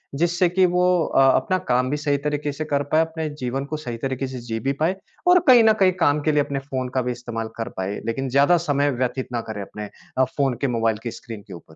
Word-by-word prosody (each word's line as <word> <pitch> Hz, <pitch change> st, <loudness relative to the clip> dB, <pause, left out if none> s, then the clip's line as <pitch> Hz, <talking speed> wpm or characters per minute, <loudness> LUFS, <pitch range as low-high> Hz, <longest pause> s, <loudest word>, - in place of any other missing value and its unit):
जिससे 175 Hz, +3 st, +2 dB
कि 185 Hz, +1 st, +3 dB
वो 180 Hz, 0 st, +2 dB, 0.2 s
अ, -, -, +2 dB
अपना 185 Hz, -, +1 dB
काम 125 Hz, +1 st, +2 dB
भी 145 Hz, -, -1 dB
सही 145 Hz, -1 st, 0 dB
तरीके 150 Hz, 0 st, -2 dB
से 155 Hz, +2 st, -5 dB
कर 145 Hz, -2 st, 0 dB
पाए, 155 Hz, -, +5 dB
अपने 160 Hz, -1 st, -4 dB
जीवन 135 Hz, +3 st, -2 dB
को 155 Hz, +2 st, -4 dB
सही 120 Hz, -6 st, -6 dB
तरीके 135 Hz, +2 st, -3 dB
से 130 Hz, -1 st, -6 dB
जी 115 Hz, -1 st, -2 dB
भी 135 Hz, +4 st, -1 dB
पाए 175 Hz, +4 st, +2 dB, 0.3 s
और 360 Hz, 0 st, +7 dB
कहीं 245 Hz, -3 st, +8 dB
न 220 Hz, 0 st, +6 dB
कहीं 185 Hz, -1 st, +6 dB
काम 145 Hz, +1 st, +3 dB
के 155 Hz, -, +2 dB
लिए 150 Hz, -1 st, +3 dB
अपने 140 Hz, -1 st, -3 dB
फ़ोन 130 Hz, -2 st, -4 dB
का 130 Hz, -, +2 dB
भी 125 Hz, 0 st, -2 dB
इस्तेमाल 120 Hz, -2 st, -5 dB
कर 115 Hz, +1 st, -3 dB
पाए। 95 Hz, +2 st, -3 dB
लेकिन 130 Hz, +4 st, -2 dB
ज़्यादा 140 Hz, +7 st, +4 dB
समय 145 Hz, 0 st, +2 dB
व्यतीत 130 Hz, +1 st, -2 dB
ना 120 Hz, -1 st, -1 dB
करे 105 Hz, -2 st, -4 dB
अपने 105 Hz, +1 st, -7 dB, 0.3 s
अ, 130 Hz, -, +5 dB
फ़ोन 135 Hz, 0 st, 0 dB
के, 140 Hz, -, +1 dB
मोबाइल 115 Hz, -3 st, 0 dB
की 120 Hz, -, -3 dB
स्क्रीन 115 Hz, -2 st, -9 dB
के -, -, -10 dB
ऊपर? 80 Hz, -2 st, -13 dB
135 Hz, 255 wpm, -23 LUFS, 120-150 Hz, 0.3 s, कहीं